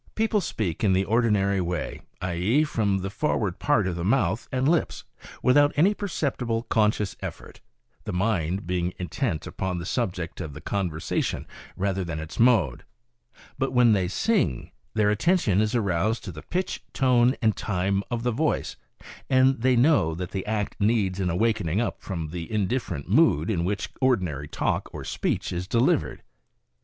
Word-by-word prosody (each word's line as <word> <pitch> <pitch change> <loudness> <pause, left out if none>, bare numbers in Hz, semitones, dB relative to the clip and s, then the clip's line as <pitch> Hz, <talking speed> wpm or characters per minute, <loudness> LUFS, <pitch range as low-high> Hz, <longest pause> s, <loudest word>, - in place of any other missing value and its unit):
People 220 -1 +1
speak 105 - -3
in 100 -3 +4
the 95 +1 +2
ordinary 105 -4 +2
way, 90 0 -3 0.2
i. 90 -1 -1
e., 105 - +2
from 105 -9 0
the 95 +1 -4
forward 105 - -1
part 115 -9 +2
of 90 -2 -2
the 85 - -4
mouth 110 -1 +1
and 130 +1 +1
lips, 165 0 +1 0.4
without 145 +3 +5
any 180 +8 +4
perceptible 135 - -2
conscious 105 -3 +1
effort, - - -8 0.4
the - - -3
mind 95 -1 0
being 90 0 -1
intent 90 - -2
upon 95 -1 -3
the 85 - -5
subject 90 -7 -3
of 75 -5 -6
the - - -7
conversation 85 -2 -2 0.3
rather 95 0 0
than 80 -3 -4
its 80 0 -7
mode; 110 - +3 0.8
but 135 0 -1
when 125 -2 +5
they 95 -3 +1
sing 95 - 0 0.2
their 105 -1 +3
attention 110 - +2
is 110 +3 0
aroused 105 +1 0
to 95 - -6
the 80 -1 -9
pitch, 185 +1 -3
tone 125 -1 +3
and 110 -3 +2
time 100 0 0
of 120 -1 -2
the 125 - +1
voice, 150 +7 -1 0.5
and 130 -1 +4
they 130 +1 +3
know 120 - +3
that 90 +1 -5
the 95 +1 -4
act 105 -2 -2
needs 100 -3 +1
an 95 -2 0
awakening 100 -1 +1
up 120 - -2
from 85 -5 -4
the 85 0 -6
indifferent 105 - -1
mood 80 +8 +3
in 85 -5 0
which 100 +3 -2
ordi 130 -6 +3
nary 75 -5 -4
talk - - -1
or - - -6
speech - - -2
is 90 +1 -3
delivered. 115 +4 +1
105 Hz, 170 wpm, -25 LUFS, 90-120 Hz, 0.8 s, without